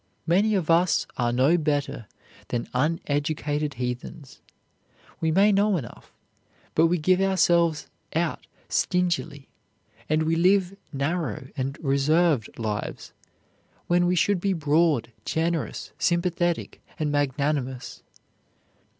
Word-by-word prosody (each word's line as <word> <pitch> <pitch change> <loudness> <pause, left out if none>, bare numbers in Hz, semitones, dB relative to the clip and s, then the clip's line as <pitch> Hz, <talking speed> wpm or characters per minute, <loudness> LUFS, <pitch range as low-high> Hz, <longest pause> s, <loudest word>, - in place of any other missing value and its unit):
Many 200 +6 +3
of 170 -4 0
us 170 +1 +3
are 120 -1 0
no 135 +8 +3
better 145 -7 -2 0.4
than 120 -1 -3
uneducated 145 0 -1
heathens. 125 +4 -6 0.8
We 160 - 0
may 195 +6 +4
know 200 0 +3
enough, 125 -8 -9 0.6
but 165 +1 +4
we 175 +2 +1
give 185 +4 +2
ourselves 170 -4 +2 0.3
out 170 0 -1 0.2
stingily 175 -6 -1 0.6
and 155 +1 +2
we 160 +1 +1
live 185 +2 +3 0.2
narrow 140 - -2
and 135 +1 -3
reserved 145 -1 +2
lives, 105 -2 -4 0.7
when 175 0 +2
we 180 - +2
should 185 +1 +2
be 195 0 +1
broad, 155 -5 +1
generous, 165 -1 -2
sympathetic, 175 0 0 0.2
and 150 -2 -1
magnanimous. 140 -2 -1
160 Hz, 110 wpm, -25 LUFS, 140-175 Hz, 0.8 s, may